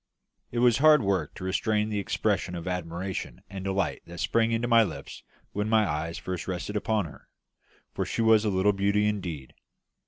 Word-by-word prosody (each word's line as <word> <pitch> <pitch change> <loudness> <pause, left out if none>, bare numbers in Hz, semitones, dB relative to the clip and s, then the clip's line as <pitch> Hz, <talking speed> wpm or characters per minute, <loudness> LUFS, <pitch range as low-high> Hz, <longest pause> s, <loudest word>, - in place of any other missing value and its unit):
It 120 - -6
was 120 0 +4
hard 150 -2 +6
work 100 -1 0
to - - -8
restrain 105 +3 0
the 105 -1 -1
expressions 90 -2 -1
of 85 - -7
admiration 90 +1 -4
and 95 -1 -6
delight 95 0 -1
that 85 0 -9
sprang 115 +5 +2
to 120 - -1
my 115 -1 +6
lips 85 -8 -7 0.3
when 105 +1 -2
my 110 -2 +4
eyes 80 +1 -3
first 90 -2 -5
rested 95 +3 -4
upon 105 -1 0
her, 75 - -13 0.6
for - - -1
she 115 - -1
was 110 -1 +5
a 110 - +1
little 95 +1 +3
beauty 100 +1 +2
indeed. 85 -10 -4
100 Hz, 185 wpm, -27 LUFS, 90-110 Hz, 0.6 s, hard